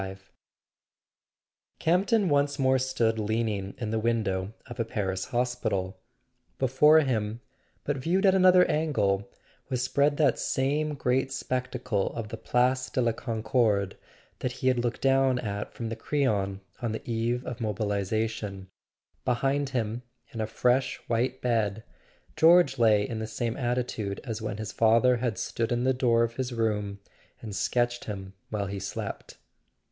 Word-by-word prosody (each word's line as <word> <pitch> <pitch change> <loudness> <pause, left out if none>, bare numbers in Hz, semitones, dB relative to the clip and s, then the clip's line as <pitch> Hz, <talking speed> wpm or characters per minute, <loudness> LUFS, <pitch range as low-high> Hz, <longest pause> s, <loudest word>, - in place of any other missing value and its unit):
XXXV 95 0 -6 1.6
C 160 - +1
AMPTON 195 +3 +3
once 145 0 +2
more 130 -1 +3
stood 115 -4 0
leaning 105 -2 -1
in 110 -3 -3
the 110 0 0
win¬ 115 0 +1
dow 95 0 -2
of 120 0 -10
a - - +2
Paris 95 -4 -2
hospital. 120 -6 -2 0.6
Before 150 +5 +5
him, 115 -5 -1 0.4
but 145 -1 -1
viewed 175 +9 +1
at 190 - +6
another 185 -1 +6
angle, 105 -11 0 0.4
was 130 -1 -1
spread 140 +3 +2
that 145 -6 +3
same 145 +3 0
great 130 0 0
spectacle 125 -5 -2
of 115 -2 -4
the 115 - -6
Place 125 +3 +1
de - - -2
la 120 -2 +3
Concorde 110 -3 0 0.4
that 125 - -2
he 130 0 0
had 125 -1 +1
looked 120 0 -2
down 135 -1 +3
at 105 -4 -4
from 115 -1 -5
the 115 - -3
Crillon 100 -11 -1 0.2
on 115 -2 -1
the 110 - -7
eve 120 +2 -1
of 120 -1 -6
mobilisation; 105 -1 -2 0.5
behind 135 +3 0
him, 120 -2 -2 0.3
in 115 - -4
a 110 - -1
fresh 125 +4 +1
white 125 +2 0
bed, 110 -3 0 0.5
George 165 -5 +5
lay 105 -3 +4
in 115 - -4
the 110 - -3
same 115 +1 -2
attitude 120 -5 -2
as 115 -4 -5
when 105 -2 -3
his 110 -3 -5
father 115 +4 +4
had 120 -2 -2
stood 115 0 -2
in 120 0 +1
the 130 +1 +3
door 120 -2 +3
of 115 0 -3
his 130 -1 -2
room 105 -4 -1 0.4
and 105 -3 -7
sketched 120 +4 0
him 95 -2 -6 0.2
while 105 -2 -2
he 100 0 -4
slept. 95 - -6
120 Hz, 160 wpm, -28 LUFS, 105-130 Hz, 1.6 s, at